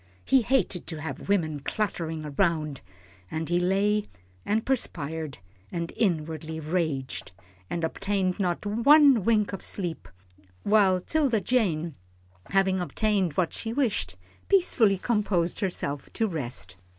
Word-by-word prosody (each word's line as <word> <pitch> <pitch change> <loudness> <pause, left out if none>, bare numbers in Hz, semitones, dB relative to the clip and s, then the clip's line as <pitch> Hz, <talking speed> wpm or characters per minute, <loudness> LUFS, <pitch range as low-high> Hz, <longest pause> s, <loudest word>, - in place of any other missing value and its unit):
He 265 -1 +5
hated 235 -7 0
to 160 -3 -4
have 150 +3 -6
women 160 -7 +1
cluttering 165 -2 -2
round, 155 -6 0 0.5
and 160 0 -3
he 175 +1 +2
lay, 200 +3 +1 0.4
and 220 +2 0
perspired, 160 - -2 0.3
and 170 -1 -4
inwardly 160 -4 -1
raged, 155 - -2 0.4
and 170 - -3
obtained 190 +3 -1
not 180 0 -1
one 260 +3 +6
wink 210 -1 +2
of 195 - -5
sleep, 175 -5 -3 0.6
while 200 -3 +4
'Tilda 270 - +1
Jane, 175 -11 0 0.5
having 190 -1 +2
obtained 190 -1 0
what 175 +2 0
she 225 0 -4
wished, 220 - 0 0.3
peacefully 250 - +4
composed 195 -5 0
herself 145 -7 -2
to 225 - +1
rest. 120 - -5
185 Hz, 125 wpm, -27 LUFS, 160-215 Hz, 0.6 s, one